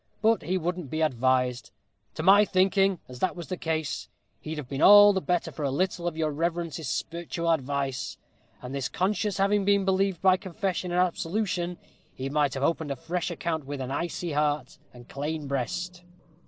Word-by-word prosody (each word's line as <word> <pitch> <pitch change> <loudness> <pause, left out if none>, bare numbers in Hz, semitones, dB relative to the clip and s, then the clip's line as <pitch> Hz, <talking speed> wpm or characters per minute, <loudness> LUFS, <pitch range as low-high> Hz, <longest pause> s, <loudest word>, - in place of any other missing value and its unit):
But 225 +1 +4
he 180 +5 -1
wouldn't 175 -3 -3
be 155 +3 -2
advised. 130 -3 +1 0.5
To 155 - -4
my 200 +4 +7
thinking, 195 0 +2
as 125 -1 -10
that 185 - 0
was 175 -2 -8
the 185 - -2
case, 160 -3 -3 0.3
he'd 155 0 -6
have 150 -4 -6
been 135 +1 -4
all 205 0 +9
the 190 - 0
better 180 -1 -1
for - - -8
a 140 - 0
little 175 +4 -1
of 165 -2 -3
your 155 -1 0
reverence's 165 0 -2
sperretual 170 +3 -2
advice; 140 -2 -2 0.5
and 125 +1 -6
his 140 -2 -2
conscience 205 +1 -1
having 200 +1 +2
been 200 0 +3
relieved 190 -2 +1
by 185 -1 +6
confession 185 -1 -3
and 175 - +1
absolution, 180 0 -1 0.4
he 130 +1 -4
might 145 -2 +1
have 135 - -3
opened 160 0 0
a 140 - -2
fresh 170 +6 -3
account 165 -6 -3
with 145 -1 -5
an 130 0 -4
aisy 170 +3 -3
heart 150 0 -1
and 120 -1 -14
clane 150 +2 -4
breast." 160 +7 -3
170 Hz, 185 wpm, -27 LUFS, 145-185 Hz, 0.5 s, all